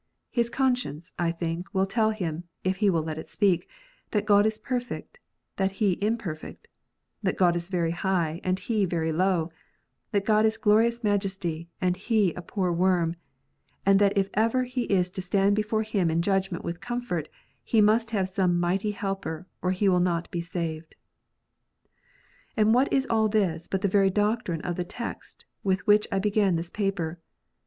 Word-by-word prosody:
His 235 Hz, -1 st, +1 dB
conscience, 245 Hz, -, -1 dB
I 170 Hz, -1 st, +1 dB
think, 170 Hz, +1 st, -4 dB
will 190 Hz, 0 st, +3 dB
tell 220 Hz, +3 st, +1 dB
him, 175 Hz, -6 st, -3 dB, 0.2 s
if 185 Hz, 0 st, 0 dB
he 205 Hz, 0 st, +3 dB
will 165 Hz, -4 st, +1 dB
let 155 Hz, 0 st, -4 dB
it -, -, -9 dB
speak, 185 Hz, -4 st, +1 dB, 0.4 s
that 210 Hz, -1 st, 0 dB
God 205 Hz, 0 st, +5 dB
is 220 Hz, 0 st, -1 dB
perfect, 250 Hz, -, -5 dB, 0.4 s
and 190 Hz, 0 st, +2 dB
he 200 Hz, 0 st, +1 dB
im 220 Hz, +3 st, +1 dB
perfect; 160 Hz, -8 st, -8 dB, 0.5 s
that 190 Hz, -3 st, -1 dB
God 175 Hz, -2 st, +4 dB
is 170 Hz, 0 st, -2 dB
very 175 Hz, -3 st, 0 dB
high, 175 Hz, -2 st, -1 dB
and 185 Hz, 0 st, +1 dB
he 205 Hz, +1 st, 0 dB
very 165 Hz, -2 st, -1 dB
low; 175 Hz, -1 st, +1 dB, 0.6 s
that 200 Hz, -2 st, 0 dB
God 215 Hz, -1 st, +4 dB
is 220 Hz, 0 st, +2 dB
glorious 230 Hz, +2 st, +3 dB
majesty, 190 Hz, -5 st, -1 dB
and 180 Hz, -1 st, +1 dB
he 205 Hz, -2 st, +1 dB
a -, -, -7 dB
poor 180 Hz, +1 st, -1 dB
worm; 175 Hz, -1 st, +2 dB, 0.7 s
and 195 Hz, 0 st, +5 dB
that 205 Hz, 0 st, +3 dB
if 195 Hz, -1 st, +3 dB
ever 230 Hz, +4 st, +2 dB
he 250 Hz, -1 st, -2 dB
is 180 Hz, -2 st, +1 dB
to 190 Hz, -, -4 dB
stand 195 Hz, +2 st, +2 dB
before 215 Hz, +1 st, 0 dB
Him 200 Hz, -6 st, 0 dB
in 165 Hz, +1 st, +1 dB
judgment 195 Hz, -2 st, 0 dB
with 170 Hz, 0 st, -4 dB
comfort, 240 Hz, -11 st, -3 dB, 0.3 s
he 225 Hz, -, +2 dB
must 220 Hz, +2 st, +4 dB
have 200 Hz, -4 st, 0 dB
some 185 Hz, -2 st, +1 dB
mighty 190 Hz, +4 st, 0 dB
Helper, 195 Hz, -5 st, -4 dB, 0.2 s
or 180 Hz, -, 0 dB
he 185 Hz, +2 st, +1 dB
will 180 Hz, -2 st, +4 dB
not 175 Hz, -1 st, 0 dB
be 170 Hz, -, -2 dB
saved. 165 Hz, -2 st, -5 dB, 1.6 s
And 215 Hz, 0 st, +4 dB
what 255 Hz, +3 st, +3 dB
is 270 Hz, -1 st, +2 dB
all 220 Hz, -1 st, +2 dB
this 180 Hz, -6 st, 0 dB
but 190 Hz, -, -2 dB
the 200 Hz, -, +2 dB
very 195 Hz, 0 st, +3 dB
doctrine 205 Hz, -4 st, 0 dB
of 175 Hz, -2 st, -3 dB
the 180 Hz, -, -1 dB
text 220 Hz, +6 st, -7 dB, 0.2 s
with 190 Hz, 0 st, 0 dB
which 210 Hz, 0 st, +4 dB
I 195 Hz, -, +1 dB
began 200 Hz, -2 st, +2 dB
this 170 Hz, +1 st, -3 dB
paper 195 Hz, -5 st, -2 dB
195 Hz, 180 wpm, -27 LUFS, 175-215 Hz, 1.6 s, God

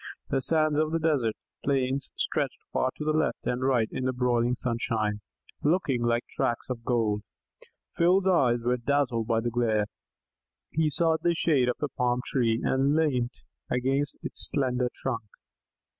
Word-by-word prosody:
The 135 Hz, -, +1 dB
sands 155 Hz, 0 st, +2 dB
of 155 Hz, 0 st, +1 dB
the 165 Hz, -, +1 dB
desert 145 Hz, -9 st, +1 dB, 0.3 s
plains 135 Hz, -1 st, 0 dB
stretched -, -, -1 dB, 0.2 s
far 130 Hz, -, +2 dB
to 155 Hz, 0 st, 0 dB
left 155 Hz, 0 st, 0 dB
and 125 Hz, +1 st, -1 dB
right 130 Hz, -4 st, +2 dB
in 130 Hz, -, -3 dB
the 130 Hz, -, +2 dB
broiling 125 Hz, -1 st, +1 dB
sunshine, 115 Hz, -4 st, -1 dB, 0.4 s
looking 145 Hz, -6 st, +1 dB
like 120 Hz, 0 st, +1 dB
tracts 120 Hz, +2 st, -2 dB
of 115 Hz, -2 st, -5 dB
gold. 110 Hz, -4 st, +1 dB, 0.8 s
Phil's 185 Hz, +3 st, +4 dB
eyes 130 Hz, -11 st, +3 dB
were 125 Hz, +1 st, +1 dB
dazzled 125 Hz, -3 st, 0 dB
by 115 Hz, -1 st, +2 dB
the 120 Hz, +1 st, -2 dB
glare; 110 Hz, -3 st, +1 dB, 0.9 s
he 160 Hz, +1 st, +2 dB
sought 160 Hz, +2 st, +1 dB
the 170 Hz, -1 st, +2 dB
shade 140 Hz, -7 st, +2 dB
of 125 Hz, -, 0 dB
a -, -, +2 dB
palm 125 Hz, -2 st, 0 dB
tree 115 Hz, -4 st, +1 dB
and 135 Hz, +2 st, +2 dB
leant 130 Hz, -6 st, 0 dB, 0.3 s
against 135 Hz, +3 st, 0 dB
its -, -, +2 dB
slender 125 Hz, -3 st, 0 dB
trunk. -, -, -4 dB
125 Hz, 160 wpm, -27 LUFS, 120-150 Hz, 0.9 s, Phil's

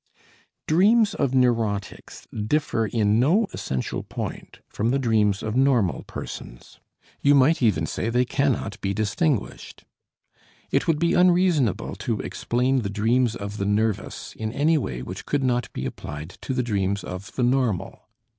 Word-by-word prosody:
Dreams 205 Hz, +7 st, +4 dB
of 135 Hz, -2 st, 0 dB
neurotics 115 Hz, -6 st, -1 dB
differ 115 Hz, 0 st, 0 dB
in 105 Hz, -1 st, +2 dB
no 175 Hz, -, +3 dB
essential 65 Hz, -1 st, -3 dB
point -, -, -7 dB
from 110 Hz, +3 st, -1 dB
the 135 Hz, -, +2 dB
dreams 110 Hz, -6 st, +1 dB
of 110 Hz, 0 st, -3 dB
normal 125 Hz, -8 st, +2 dB
persons; -, -, -9 dB, 0.4 s
you 145 Hz, 0 st, +5 dB
might 140 Hz, +4 st, +4 dB
even 100 Hz, -9 st, +2 dB
say 110 Hz, -, -3 dB
they 125 Hz, +2 st, +2 dB
cannot 130 Hz, -6 st, -1 dB
be 100 Hz, 0 st, -1 dB
distinguished. 110 Hz, -, -2 dB, 0.9 s
It -, -, +1 dB
would 160 Hz, -, +3 dB
be 170 Hz, +2 st, +1 dB
unreasonable 175 Hz, -, +2 dB
to -, -, -2 dB
explain 125 Hz, +2 st, 0 dB
the 100 Hz, -, -3 dB
dreams 115 Hz, +3 st, +1 dB
of 100 Hz, +1 st, -6 dB
the 100 Hz, -, -2 dB
nervous 105 Hz, +1 st, -1 dB
in 110 Hz, 0 st, -4 dB
any 155 Hz, +5 st, +3 dB
way 65 Hz, -, -2 dB
which -, -, -8 dB
could 145 Hz, -2 st, 0 dB
not 125 Hz, -1 st, 0 dB
be 65 Hz, -, -5 dB
applied 75 Hz, +5 st, -6 dB
to 130 Hz, -, -3 dB
the 125 Hz, -, +1 dB
dreams 100 Hz, -3 st, -1 dB
of 90 Hz, +3 st, -8 dB
the 125 Hz, -, 0 dB
normal. 120 Hz, -6 st, 0 dB
120 Hz, 155 wpm, -24 LUFS, 105-140 Hz, 0.9 s, you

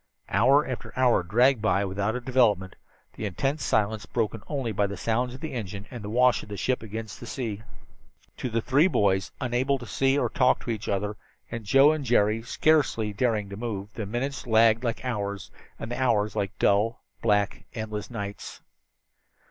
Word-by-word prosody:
Hour 140 Hz, +2 st, +4 dB
after 130 Hz, -2 st, -5 dB
hour 125 Hz, -6 st, +4 dB
dragged 120 Hz, +8 st, +3 dB
itself 110 Hz, +1 st, +2 dB
by 100 Hz, +1 st, +1 dB
without 100 Hz, +3 st, -1 dB
a 125 Hz, -, -3 dB
development, 115 Hz, -7 st, +2 dB, 0.4 s
the 110 Hz, -, -5 dB
intense 135 Hz, -, -2 dB
silence 110 Hz, 0 st, 0 dB
broken 110 Hz, -2 st, -2 dB
only 135 Hz, -6 st, -2 dB
by 100 Hz, 0 st, +1 dB
the 100 Hz, -1 st, -6 dB
sounds 120 Hz, +5 st, -1 dB
of 130 Hz, -, -12 dB
the 160 Hz, -3 st, -5 dB
engines 100 Hz, -4 st, -5 dB
and 120 Hz, -4 st, -7 dB
the 105 Hz, -, -5 dB
wash 125 Hz, +2 st, +3 dB
of -, -, -12 dB
the 100 Hz, -, -5 dB
sea 130 Hz, -, 0 dB
against 110 Hz, 0 st, -7 dB
the 120 Hz, -, -9 dB
ship. 115 Hz, -5 st, -4 dB, 0.8 s
To 125 Hz, -, -3 dB
the 115 Hz, 0 st, 0 dB
three 145 Hz, +6 st, +4 dB
boys, 95 Hz, -, +1 dB
unable 130 Hz, +2 st, 0 dB
to 125 Hz, -, -9 dB
see 135 Hz, +2 st, +1 dB
or -, -, +2 dB
talk 130 Hz, -2 st, +2 dB
to 120 Hz, -, -3 dB
each 110 Hz, -1 st, -4 dB
other, 100 Hz, +1 st, -1 dB, 0.3 s
and 115 Hz, -2 st, -5 dB
Joe 135 Hz, +7 st, +6 dB
and 155 Hz, -2 st, -2 dB
Jerry 110 Hz, -3 st, +2 dB
scarcely 125 Hz, -4 st, +1 dB
daring 110 Hz, -2 st, 0 dB
to 100 Hz, -, -7 dB
move, 105 Hz, -2 st, -5 dB
the 110 Hz, -4 st, -5 dB
minutes 125 Hz, +5 st, -3 dB
lagged 115 Hz, +1 st, +4 dB
like 115 Hz, +1 st, -2 dB
hours, 100 Hz, -5 st, -3 dB, 0.3 s
and 110 Hz, -, -6 dB
the 125 Hz, -, -3 dB
hours 110 Hz, -5 st, +1 dB
like 100 Hz, -1 st, -2 dB
dull, 105 Hz, +3 st, +2 dB, 0.2 s
black, 105 Hz, -2 st, +1 dB
endless 110 Hz, -2 st, -4 dB
nights. 100 Hz, -4 st, -6 dB
115 Hz, 190 wpm, -26 LUFS, 105-125 Hz, 0.8 s, Joe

